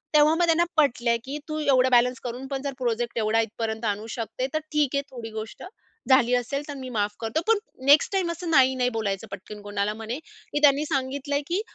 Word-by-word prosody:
तेव्हा 300 +1 +6
मग 345 0 +3
त्यांना 335 0 +3
पटल्या 240 -5 +3
की 280 +3 -4
"तू 310 - -2
एवढं 260 -3 +3
बॅलन्स 250 +1 +4
करून 250 +2 -5
पण 270 -1 -3
जर 280 -1 -3
प्रोजेक्ट 240 -1 -1
एवढा 215 +1 +2
इथपर्यंत 220 0 -3
जाणू 210 +1 -2
शकते 230 +3 -3
तर 310 - +1
ठीक 295 -2 +2
आहे 280 - +2
थोडी 235 -3 -7
गोष्ट 220 +1 -8 0.5
झाली 250 -2 +5
असेल 275 +4 -2
तर 290 - -5
मी 260 -1 -7
माफ 210 -3 -1
करतो. 230 +8 -1
पण 455 -2 +5 0.3
नेक्स्ट 285 +6 +6
टाईम 370 -3 +1
असं 335 0 -5
नाही 265 -4 +5
नाही 250 -1 +1
बोलायचं 200 0 -2
पटकन 205 +2 -8
कोणाला." 205 0 -2
म्हणे 225 +5 -5
की 295 -2 -7
त्यांनी 290 +1 +5
सांगितलंय 285 0 -1
की 360 +4 0
255 Hz, 210 wpm, -25 LUFS, 225-290 Hz, 0.5 s, तेव्हा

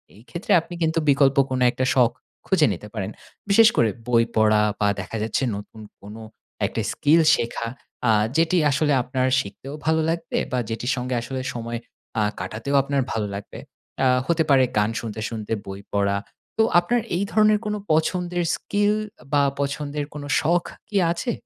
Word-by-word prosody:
এই 105 - -16
ক্ষেত্রে 170 - -4
আপনি 175 - -11
কিন্তু 160 +1 +1
বিকল্প 140 -1 +4
কোনো 130 -1 0
একটা 130 - -1
শখ 120 -3 +4 0.4
খুঁজে 165 -7 +4
নিতে 105 +4 -9
পারেন। 105 -1 -4 0.4
বিশেষ 220 +2 +7
করে 115 - +4 0.2
বই 115 -1 +4
পড়া 110 -1 +4 0.2
বা 105 - +2
দেখা 95 +4 -5
যাচ্ছে 115 +4 -1
নতুন 105 +2 -9 0.2
কোনো 105 +3 -10 0.4
একটা - - -2
স্কিল 155 +3 +4
শেখা, 115 0 -3 0.4
আ - - +6 0.3
যেটি 165 +2 +3
আসলে 145 +1 +2
আপনার 130 +1 -1
শিখতেও 130 +5 -7
ভালো 160 0 +2
লাগবে 165 0 -2
বা 125 - 0
যেটির 120 +3 -2
সঙ্গে 125 0 -3
আসলে 130 +2 -4
সময় 115 0 -4 0.4
আ - - +2 0.2
কাটাতেও 115 +6 -3
আপনার 140 0 0
ভালো 105 -2 -1
লাগবে। 100 - -8 0.5
আ - - +5 0.2
হতে 165 -1 +2
পারে 135 -2 +6
গান 105 +1 +3
শুনতে, 110 -2 -6
শুনতে 110 -1 -4
বই 95 0 -7
পড়া। 100 0 +1 0.4
তো 220 - +5 0.2
আপনার 240 +7 0 0.2
এই 195 - 0
ধরনের 215 0 +4
কোনো 210 0 -1 0.2
পছন্দের 175 +2 0
স্কিল 205 +1 0 0.4
বা 145 -1 +4 0.2
পছন্দের 145 +1 -3
কোনো 145 -1 -7
শখ 170 +3 +2 0.2
কি 210 - -9 0.2
আছে? 235 +8 -2
135 Hz, 170 wpm, -23 LUFS, 115-165 Hz, 0.5 s, বিশেষ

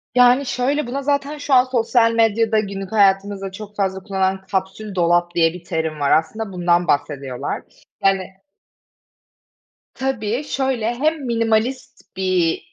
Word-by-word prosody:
Yani, 250 +2 +5
şöyle 265 +2 -1
buna 270 +3 -3
zaten 285 +1 -1
şu 290 -1 -2
an 250 -1 +7
sosyal 240 -2 +2
medyada 225 -1 +2
günlük 195 -2 -5
hayatımızda 195 -1 +2
çok 210 +1 -10
fazla 190 -2 -1
kullanılan 190 -1 -1
kapsül 195 +1 -3
dolap 175 0 +2
diye 165 -1 +3
bir 180 -1 -10
terim 160 -2 -3
var 140 -1 +1
aslında 195 +7 0
bundan 175 -1 +1
bahsediyorlar. 140 -3 -2 0.4
Yani, 195 -1 +3 1.7
tabii 255 -1 -2
şöyle 260 -5 -1
hem 300 +2 -1
minimalist 230 0 -1
bir 185 -3 +1
210 Hz, 130 wpm, -20 LUFS, 185-245 Hz, 1.7 s, an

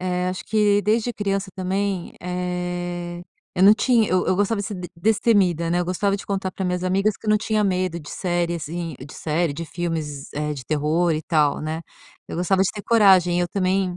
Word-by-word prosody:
eh, 180 0 -1
acho 185 - -4
que 205 -1 +3
desde 225 +3 +1
criança 195 -2 -2
também, 190 0 -2
eh, 180 -1 -4 0.3
eu 180 - +1
não 200 +2 +9
tinha 230 -2 +3
eu 185 0 +1
eu - - +3
gostava 205 +2 +1
de - - -4
ser 210 - -5
d 180 -1 -6
destemida, 190 -4 +2
né, 175 - +2
eu - - 0
gostava 195 +3 0
de - - -10
contar 195 -1 -2
para 190 - -5
as - - 0
minhas 180 0 -1
amigas 195 +3 +1
que - - -14
eu 215 - +2
não 215 - +5
tinha 215 0 0
medo 185 -3 0
de 145 - -10
série, 175 -2 -1
assim 165 +1 -5
de - - -12
série, 160 0 -1
de 165 +4 -5
filmes, 160 -5 -4
eh, 150 0 -2
de 135 -4 -7
terror, 155 +4 +1
e 155 +1 -2
tal, 150 -3 +2
né. 155 +1 -3 0.5
Eu - - -6
gostava 190 +2 +2
de 195 - +1
ter 205 - -7
coragem, 190 -6 +5
e - - +2
eu 175 - -1
também 185 -1 0
180 Hz, 225 wpm, -23 LUFS, 170-200 Hz, 0.5 s, não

